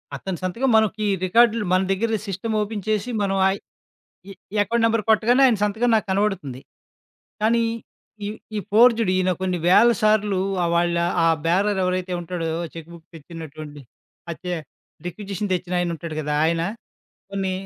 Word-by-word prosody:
అతని 180 +5 -5
సంతకం 230 +9 -1
మనకి 215 0 +1 0.2
రికార్డ్‌లో 230 +2 +3
మన 185 - +4
దగ్గర 220 +3 0
సిస్టమ్ 205 +4 -3
ఓపెన్ 210 -2 -4
చేసి 215 +3 0
మనం 195 -1 0
ఆ - - +3 0.8
ఈ - - -8
ఎ - - -13 0.3
ఎకౌంట్ 230 +2 0
నెంబర్ 225 -1 +2
కొట్టగానే 235 +4 +4
ఆయన 235 -4 +3
సంతకం 220 +4 0
నాకు 215 - -1
కనబడుతుంది. 190 -10 -1 0.8
కానీ. 230 +1 +3 0.6
ఈ, - - -2 0.3
ఈ - - 0
ఫోర్జుడు 230 -2 +5
ఈయన 185 0 +1
కొన్ని 185 -2 -1
వేల 210 +7 +6
సార్లు 210 -2 +2 0.3
వాళ్ళ 170 0 +2 0.3
ఆ - - +4 0.2
బేారర్ 195 +4 +1
ఎవరైతే 185 0 -1
ఉంటాడో 170 -1 -4 0.2
చెక్కు 165 0 -10
బుక్కు 170 0 -16
తెచ్చినటువండి 155 -2 -10 0.5
అచ్చే 180 +2 -4 0.5
రిక్యుజిషన్ 200 +2 -5
తెచ్చినాయన 175 -1 -1
ఉంటాడు 165 0 -7
కదా! 150 -1 -2
ఆయన. 165 0 0 0.7
కొన్ని 195 -1 -1
195 Hz, 145 wpm, -22 LUFS, 175-215 Hz, 0.8 s, వేల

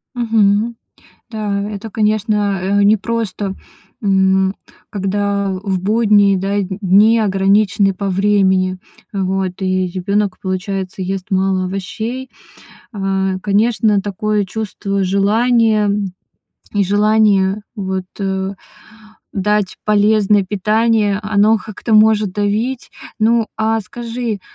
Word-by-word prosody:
Мгм. 225 -1 +1 0.6
Да, 210 -3 -2
это, 210 +1 -7
конечно, 210 -1 0
э, 200 +2 +1
непросто, 205 -1 0 0.5
м, 190 -1 +2 0.4
когда 200 0 -1
в 190 -2 -1
будние, 205 -1 +3
да, 195 +2 -2
дни 200 +3 +3
ограничены 195 -1 +2
по 200 +1 -3
времени. 190 -1 +2 0.3
Вот, 190 -1 -1
и 185 0 0
ребенок, 195 +2 -1
получается, 190 0 -4
ест 190 0 -4
мало 190 -1 +1
овощей. 220 +7 -5 0.6
Э, 195 -2 -1
конечно, 210 0 +2
такое 210 +1 -1
чувство 200 -1 -3
желания, 215 +2 +2 0.8
и 205 - +1
желание, 205 -1 +2 0.2
вот, 190 -2 -3
э, 190 -1 -2 0.8
дать 210 0 0
полезное 210 -1 +3
питание, 210 +1 +1
оно 215 +1 +3
как-то 215 +1 -3
может 215 -2 +4
давить. 215 +6 -2 0.3
Ну, 225 +1 +2
а 220 0 0
скажи, 230 0 -5
205 Hz, 100 wpm, -17 LUFS, 190-215 Hz, 0.8 s, может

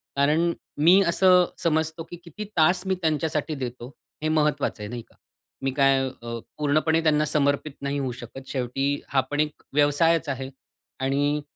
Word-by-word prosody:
कारण 155 +5 +2 0.3
मी 175 +6 +6
असं 180 +1 +5 0.2
समजतो, 160 0 0
की 175 - -10
किती 180 +5 -8
तास 180 +4 +3
मी 190 - +1
त्यांच्यासाठी 155 -1 -1
देतो 125 -2 -6 0.4
हे 155 - +1
महत्वाचं 150 -7 0
आहे, 105 - -5
नाही 120 0 -5
का? - - -27 0.5
मी 135 - 0
काय 135 -1 +4
अ, 115 -2 -7 0.2
पूर्णपणे 155 +2 +2
त्यांना 150 -1 +3
समर्पित 145 0 0
नाही 140 +1 -2
होऊ 130 -2 -2
शकत. 120 +3 -9
शेवटी 130 +1 -2 0.2
हा 135 -2 +3
पण 145 - -1
एक 150 0 -1
व्यवसायचं 145 +1 +3
आहे 135 0 -5 0.5
आणि 145 +2 0
150 Hz, 160 wpm, -25 LUFS, 135-160 Hz, 0.5 s, मी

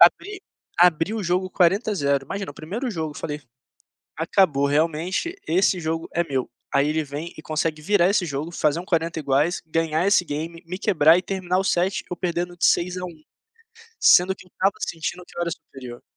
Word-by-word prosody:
Abri 415 -2 +4 0.4
abri 175 +2 +4
o 215 - -3
jogo 185 +1 0
40 195 +5 +2
a - - -1
0, 140 -4 +1
imagina 195 -3 -4
o 145 - -13
primeiro 225 +11 -4
jogo 160 -5 -3
eu - - -10
falei: 150 -1 -5 0.8
"Acabou 160 -4 +2
realmente 165 - 0
esse 185 +2 +2
jogo 165 +1 -2
é 170 - +2
meu", 135 -5 -2 0.2
aí 140 +1 +3
ele 155 0 0
vem 150 +4 -6
e - - -8
consegue 155 0 -2
virar 190 +1 +3
esse 200 -3 +2
jogo, 150 +2 -4
fazer 155 -1 +1
um 180 - -7
40 165 -2 0
iguais, 145 +4 +1
ganhar 165 +2 0
esse 200 -3 +4
game, 165 +3 -5
me 180 +2 -5
quebrar 165 -5 +5
e - - 0
terminar 185 -1 -1
o - - 0
set, 185 +2 +1
eu 180 - -3
perdendo 175 0 -2
de - - +2
6 180 +1 +2
a 180 - -5
1, 160 -3 -11 0.8
sendo 185 +2 +6
que 185 - -16
eu - - -23
estava 195 +1 +1
sentindo 165 +2 -4
que - - -18
eu - - 0
era 170 - -1
superior. 125 -7 -9
170 Hz, 205 wpm, -23 LUFS, 155-185 Hz, 0.8 s, sendo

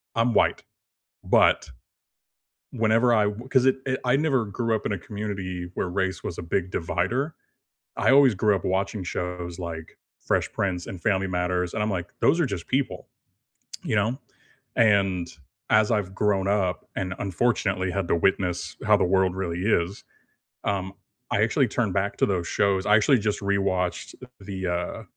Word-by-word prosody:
I'm 115 0 +2
white, - - +2 0.6
but - - +3 1.0
whenever 115 +1 +3
I 105 -2 +4
w 110 +5 -4
'cause 130 -2 +3
it 130 0 +4
it 130 0 0
I 125 +2 +4
never 135 -7 +1
grew 115 +3 -1
up 105 - -5
in - - -1
a 95 - -3
community 95 -3 -5
where 90 - -2
race 95 0 -2
was 85 - -5
a - - -5
big 90 +2 -1
divider. 120 - -1 0.7
I - - +3
always 135 -5 +6
grew 105 +2 +2
up 90 - -6
watching 95 +1 -1
shows 90 0 -4
like 80 -2 -7 0.2
Fresh - - 0
Prince 90 -3 -1
and 95 - -7
Family 95 -2 +1
Matters, 90 -1 -1
and 105 - -1
I'm 105 - 0
like, 90 -3 -3
"Those 170 - +3
are 155 - +3
just 95 -7 -5
people," 135 +1 -1 0.8
you - - -1
know, 115 +6 +1 0.6
and 95 -6 +3 0.4
as 110 +1 +4
I've 100 -3 -1
grown 100 -2 +1
up 95 -3 0
and 95 0 -2
unfortunately 95 -2 0
had 95 -2 -2
to - - +3
witness 90 0 0
how - - +5
the - - +1
world 95 0 +2
really 90 -2 -3
is, 95 -2 0 0.6
um, 95 -1 -1 0.4
I - - +2
actually - - +2
turned - - -1
back 100 +1 -1
to - - +3
those 90 -4 -1
shows, 95 -1 +1
I 105 0 +5
actually 125 +3 +4
just 105 0 -1
rewatched, 95 -2 -1
uh, - - -9
the, 95 -2 -5
uh 90 0 -3
95 Hz, 175 wpm, -25 LUFS, 90-110 Hz, 1.0 s, always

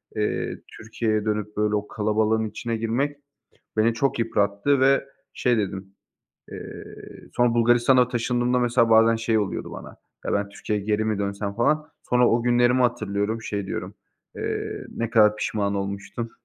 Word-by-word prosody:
eee, 105 -1 -2 0.2
Türkiye'ye 110 -1 -2
dönüp 105 -1 -2
böyle 105 0 +1
o 105 0 -2
kalabalığın 110 +1 +1
içine 115 +1 -4
girmek 125 +6 -1 0.6
beni 110 +2 +3
çok 135 +3 0
yıprattı 115 +4 +1
ve 135 +1 +4 0.3
şey 125 -2 +1
dedim; 95 -2 -3 0.6
eee, - - -8 0.5
sonra 120 -1 +2
Bulgaristan'a 120 +2 +4
taşındığımda, 125 +1 0
mesela, 120 -1 +2
bazen 115 0 +6
şey 115 0 +1
oluyordu 100 -3 -3
bana: - - -9 0.3
"Ya, - - -1
ben 100 0 0
Türkiye'ye 105 0 -3
geri 105 +1 +1
mi 110 -2 -1
dönsem?" 100 0 -3
falan. 150 +7 +1
Sonra 125 0 +3
o 115 +1 +2
günlerimi 120 +1 +3
hatırlıyorum, 110 -2 -1
şey 100 -3 -3
diyorum, - - -5 0.4
eee, - - -4
ne 115 -1 -2
kadar 105 -3 +5
pişman 100 -1 -1
olmuştum. 100 +4 -4
110 Hz, 150 wpm, -24 LUFS, 105-120 Hz, 0.6 s, bazen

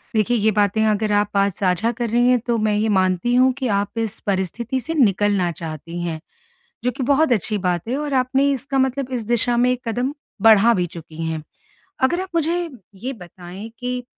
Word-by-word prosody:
देखिए 225 +3 +2
ये 215 +1 +2
बातें 210 +1 +2
अगर 215 0 +1
आप 205 0 +1
आज 200 0 +3
साझा 185 +5 +1
कर 240 -1 -3
रही 240 +2 +3
हैं 250 -1 +4
तो 235 -1 +1
मैं 215 -1 +1
ये 215 +1 +1
मानती 185 +3 +1
हूँ 255 +1 +5
कि 265 -1 -3
आप 200 0 -1
इस 225 -3 -2
परिस्थिति 205 +6 -1
से 325 +6 -4
निकलना 205 - +2
चाहती 165 +1 -7
हैं, 165 -2 -3 0.7
जो 250 - +2
कि 255 - -6
बहुत 280 +2 +3
अच्छी 210 -1 +1
बात 180 0 -1
है 255 - 0
और 295 -2 -3
आपने 265 +2 +2
इसका 270 +1 -2
मतलब 265 0 0
इस 235 -3 -2
दिशा 240 +1 +2
में 245 +1 +3
एक 250 -1 -3
कदम 245 +4 -1 0.3
बढ़ा 225 +1 +7
भी 180 -1 0
चुकी 165 -1 -8
हैं। 160 -1 -3 0.6
अगर 345 +8 +2
आप 375 - -6
मुझे 335 +2 0 0.3
ये 250 +8 -5
बताएँ 180 +1 -10
कि, 250 0 -3
225 Hz, 205 wpm, -21 LUFS, 195-255 Hz, 0.7 s, बढ़ा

